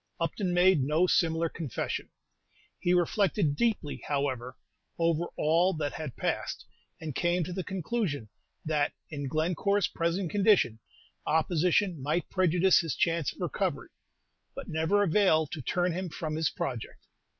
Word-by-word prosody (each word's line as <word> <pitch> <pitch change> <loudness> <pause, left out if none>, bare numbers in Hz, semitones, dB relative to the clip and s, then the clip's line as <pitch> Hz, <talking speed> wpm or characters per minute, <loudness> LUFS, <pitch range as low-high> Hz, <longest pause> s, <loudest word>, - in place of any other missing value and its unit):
Upton 190 -4 -1
made 175 -2 +4
no 155 +6 +2
similar 165 -2 +2
confession. 155 -6 -4 0.7
He 175 - +1
reflected 180 -2 +2
deeply, 210 -8 -1
however, 130 -3 -2 0.4
over 165 0 +1
all 170 +5 +3
that 150 -2 -2
had 150 -6 -6
passed, - - -2 0.3
and 155 -3 -5
came 175 +4 +1
to 175 +3 -5
the 185 0 -3
conclusion 180 - -2 0.4
that, 150 -2 +1 0.2
in 145 -2 -4
Glencore's 175 +7 +1
present 170 +1 -1
condition, 200 - +3 0.5
opposition 170 +2 +2
might 155 +6 -1
prejudice 185 0 +4
his 165 -4 -2
chance 165 -4 +1
of - - -14
recovery, - - -2 0.7
but - - -7
never 160 +6 +2
avail 170 -4 +3
to 150 +1 -7
turn 175 +8 0
him 185 +1 -3
from 155 0 -4
his 160 0 +1
project. 125 -5 -5
165 Hz, 140 wpm, -29 LUFS, 150-180 Hz, 0.7 s, made